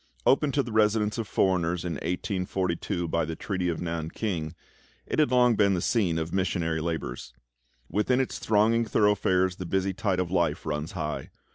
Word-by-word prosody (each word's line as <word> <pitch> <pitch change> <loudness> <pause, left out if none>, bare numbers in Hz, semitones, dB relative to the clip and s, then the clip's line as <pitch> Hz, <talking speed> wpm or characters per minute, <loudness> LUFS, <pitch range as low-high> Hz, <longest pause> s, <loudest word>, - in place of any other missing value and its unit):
Opened 140 +1 +3
to 140 - +3
the 120 - -7
residence 110 0 +2
of 110 - -3
foreigners 90 -3 +1
in 85 - -2
1842 90 +1 -2
by 85 0 0
the 80 +1 -4
treaty 95 0 -2
of 85 - -2
Nan 80 -2 -3
king, 85 -6 -3 0.5
it - - -2
had 150 - +4
long 125 -1 +4
been 100 -2 +3
the - - 0
scene 90 -4 +1
of 80 0 -3
missionary 85 -4 0
labours. 80 -7 -4 0.5
Within 125 +5 +1
its 130 - -2
thronging 110 +2 +3
thoroughfares 95 -4 +2
the 90 - -5
busy 95 +1 0
tide 95 -1 -1
of 90 -2 -1
life 85 -4 0
runs 75 0 -3
high. 75 -1 -4
90 Hz, 175 wpm, -27 LUFS, 85-105 Hz, 0.5 s, had